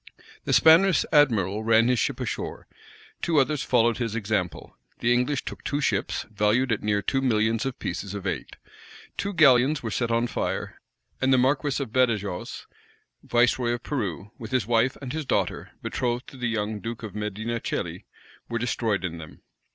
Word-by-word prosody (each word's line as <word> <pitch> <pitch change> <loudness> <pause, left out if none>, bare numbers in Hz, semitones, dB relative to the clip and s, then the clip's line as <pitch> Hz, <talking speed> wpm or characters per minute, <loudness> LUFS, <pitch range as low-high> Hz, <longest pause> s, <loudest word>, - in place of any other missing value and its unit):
The - - -1
Spanish 170 +3 +6
admiral 110 - +3
ran 115 +1 +4
his 125 -2 +2
ship - - -1
ashore: - - -4 0.6
two 165 -2 +1
others 145 +1 +2
followed 120 -1 +2
his 115 -3 -2
example: 100 -7 -2 0.2
the 120 0 +2
English 125 +3 0
took - - -7
two 145 - -1
ships, 105 -8 -1
valued 105 +5 +2
at 110 - 0
near 105 -1 0
two 135 - 0
millions 115 0 +1
of 130 - -4
pieces 95 +3 -4
of 100 -1 -6
eight. - - -4 0.6
Two 200 - -2
galleons 140 -4 +4
were 115 - -3
set 115 +4 -1
on 115 +1 +2
fire; 120 - -3 0.4
and 130 0 +3
the 130 - +6
marquis 135 +3 +1
of 120 - -10
Badajox, 110 -8 0 0.6
viceroy 120 0 +2
of 120 - -5
Peru, 105 - -3
with 110 - -7
his 125 -4 +1
wife, 120 +3 +2
and 130 0 -5
his 160 0 -2
daughter, - - -1
betrothed 125 0 -2
to 135 - -13
the 125 -2 -1
young 105 -1 -2
duke 115 +2 -6
of 105 -4 -6
Medina 105 +3 -3
Celi, - - -4 0.4
were 115 - -1
destroyed 110 -4 -1
in 85 -2 -5
them. 80 -1 -12
120 Hz, 175 wpm, -26 LUFS, 105-130 Hz, 0.6 s, Spanish